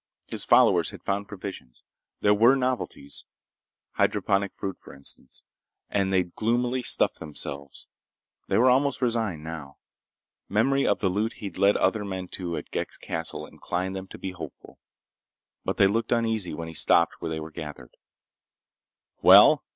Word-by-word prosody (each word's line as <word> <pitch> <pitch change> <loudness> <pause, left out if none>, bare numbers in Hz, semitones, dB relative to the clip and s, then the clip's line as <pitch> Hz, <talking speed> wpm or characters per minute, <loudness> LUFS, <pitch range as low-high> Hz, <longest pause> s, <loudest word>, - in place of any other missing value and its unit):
His - - -1
followers - - +5
had - - -11
found 100 +1 -2
provisions. 95 - -9 0.4
There 105 - +5
were 115 +6 +5
novelties—hydroponic 100 - -3
fruit, 95 -2 -6
for - - -13
instance—and 95 +7 -6
they'd 90 -2 +1
gloomily 120 +3 0
stuffed - - 0
themselves. 70 -2 -5 0.6
They - - +1
were 125 +2 +5
almost 140 +1 +2
resigned, 110 -10 0
now. 80 -4 -8 0.7
Memory 135 +6 +2
of - - +1
the 95 - +2
loot 105 +5 -1
he'd 100 -4 -8
led 100 +1 +4
other 110 -2 +1
men 95 -2 -5
to 85 -3 -4
at - - -8
Ghek's - - -3
castle 80 0 -3
inclined 90 +2 -4
them 95 0 -6
to - - -11
be 95 - -5
hopeful. 90 -3 -10 0.8
But - - -2
they 100 - +6
looked 110 +3 0
uneasy 115 -7 0
when 80 +1 -6
he 80 - -8
stopped 85 +1 +3
where 85 - -4
they 80 0 -3
were 80 0 -8
gathered. 75 -6 -9 1.3
"Well?" - - +8
95 Hz, 150 wpm, -26 LUFS, 80-115 Hz, 1.3 s, Well